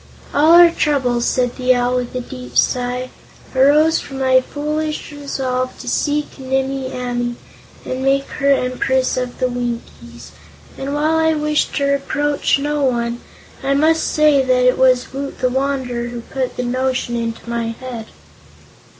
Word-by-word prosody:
"All 305 +3 +5
our 345 0 +8
troubles," 255 -7 +1
said 250 -1 0
the 255 0 +3
Owl 245 +1 +1
with 250 0 -4
a 250 - -1
deep 250 0 -8
sigh, 250 0 0 0.4
"arose 300 +5 +4
from 270 - -8
my 260 -1 +4
foolish 305 +3 -3
resolve 260 -3 -3
to - - -10
seek 295 -1 -1
Nimmie 265 0 -2
Amee 245 -1 -3 0.5
and 255 +1 -3
make 275 +1 +2
her 280 -1 +2
Empress 260 0 +1
of 250 -1 -3
the 255 - +1
Winkies, 240 -1 -6 0.4
and 275 +2 -4
while 310 +2 +1
I 320 0 +2
wish 300 0 +1
to 280 - -1
reproach 285 +1 +1
no 295 +1 -1
one, 235 -2 0 0.4
I 275 +1 +1
must 320 +3 +3
say 300 -3 +4
that 255 -1 +2
it 250 - +3
was 255 -1 +3
Woot 275 +1 -5
the 255 - +1
Wanderer 260 -2 -2
who 240 0 -6
put 260 +2 -4
the 250 - -1
notion 255 0 -1
into 230 0 -4
my 235 -1 -2
head." 230 -1 -7
260 Hz, 160 wpm, -18 LUFS, 250-285 Hz, 0.5 s, our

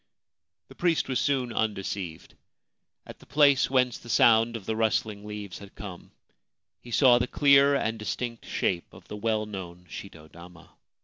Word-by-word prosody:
The - - -12
priest 170 -3 0
was 130 - 0
soon 130 -4 0
undeceived. 95 -6 -3 0.7
At - - -12
the - - -18
place 140 -2 +4
whence 125 -2 +1
the 120 - -14
sound 115 +1 +4
of 100 - -13
the 110 - -2
rustling 110 -1 -1
leaves 105 -3 -7
had 100 -1 -13
come, 95 -4 -9 0.7
he 120 - -13
saw 120 0 +5
the 125 - -1
clear 140 0 +5
and 110 -4 -1
distinct 115 +2 -4
shape 85 -2 -2
of 90 0 -16
the - - -6
well 110 0 -1
known 90 -4 -8
shito 80 -3 -10
dama. 85 0 -14
110 Hz, 165 wpm, -27 LUFS, 95-125 Hz, 0.7 s, saw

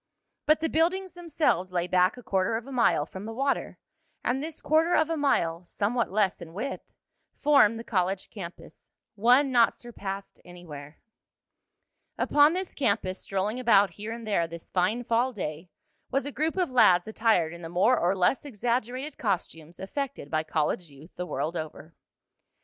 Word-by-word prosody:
But 310 +1 +4
the 325 - +1
buildings 355 +3 0
themselves 310 - 0
lay 175 -1 0
back 180 +4 +2
a 250 - -11
quarter 190 +2 0
of 230 - -7
a 275 - -10
mile 235 - +2
from 190 +5 -9
the 225 - -5
water, 275 +5 -1 0.5
and 255 +2 0
this 315 +1 -5
quarter 320 +3 +2
of 315 +1 +2
a - - +1
mile, 175 - +1
somewhat 220 +6 -1
less 195 -2 +1
in 165 0 -10
width, 260 +7 -5 0.5
formed 275 -7 +5
the 230 - -6
college 190 -3 -1
campus 180 -5 -10 0.2
one 250 +6 +4
not 240 -2 +4
surpassed 200 -5 -7
anywhere. 155 -5 -11 1.2
Upon 295 +2 +4
this 370 0 -4
campus, 200 -7 -1
strolling 200 +5 -2
about 205 -6 +4
here 210 +5 -7
and 230 0 -7
there 195 -6 +1
this 170 0 -10
fine 190 +7 +1
fall 240 +2 +1
day, 165 -3 -5 0.4
was 275 0 0
a 285 - -4
group 315 +5 -1
of 360 -6 0
lads 180 -8 +5
attired 220 -7 +1
in 170 - -10
the 165 - -7
more 185 +9 +3
or 180 -3 +1
less 185 +8 +2
exaggerated 250 +2 -3
costumes 170 -5 -3
effected 270 - -5
by 155 - +1
college 160 +2 -1
youth 145 +4 -15
the 180 - -5
world 165 0 -3
over. 155 0 -7
215 Hz, 170 wpm, -27 LUFS, 180-265 Hz, 1.2 s, formed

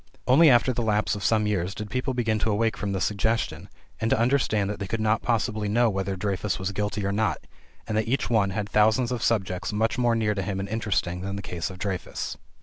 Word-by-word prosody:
Only 145 +5 +6
after 125 0 +4
the 120 - -2
lapse 105 -5 +1
of 105 -1 -4
some 110 -1 +2
years 100 -2 -1
did 105 -2 -6
people 130 +1 -1
begin 110 -3 0
to 110 - 0
awake 110 +2 +1
from 100 -1 -3
the 95 - -1
"suggestion" 110 +4 -1 0.3
and 110 - 0
to - - +3
understand 115 -4 +2
that 105 - -6
they 100 - -4
could 115 +3 -2
not 110 0 +1
possibly 110 -3 0
know 115 +2 +3
whether 95 0 -2
Dreyfus 100 0 -2
was 95 +1 -3
guilty 105 0 -2
or 100 - 0
not, 110 +2 0 0.5
and 105 - -3
that 110 +1 0
each 120 -4 0
one 110 -3 +2
had 100 +1 -3
thousands 110 +4 +3
of 125 -2 -2
subjects 100 -7 0
much 110 +3 0
more 120 -1 +3
near 110 -2 +1
to 100 - -2
him 95 +1 -3
and 95 - -3
interesting 100 -5 -1
than 100 +1 -4
the 100 - -5
case 90 -1 -4
of 95 - -9
Dreyfus. 95 -1 -4
105 Hz, 240 wpm, -26 LUFS, 100-115 Hz, 0.5 s, Only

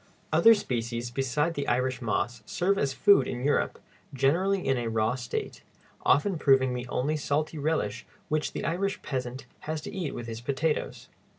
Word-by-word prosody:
Other 230 0 +7
species 120 - -3
beside 135 +6 0
the 145 -3 -3
Irish 130 0 0
moss 120 0 -1
serve 195 +3 +1
as 140 - +1
food 140 -2 +5
in 125 0 -4
Europe, 145 - +1 0.4
generally 180 +9 +2
in 135 - +3
a 120 -2 -2
raw 110 +1 +1
state, 125 -2 -4 0.4
often 170 +3 +3
proving 130 -3 +4
the 125 0 -4
only 140 +5 0
salty 150 +1 -1
relish 130 -8 -1 0.2
which 155 0 -1
the - - -4
Irish 185 +3 -1
peasant 130 -1 -4 0.2
has 155 0 -1
to - - -8
eat 175 -7 -3
with 120 - -5
his 115 0 -6
potatoes. 145 +5 -2
135 Hz, 170 wpm, -28 LUFS, 120-160 Hz, 0.4 s, Other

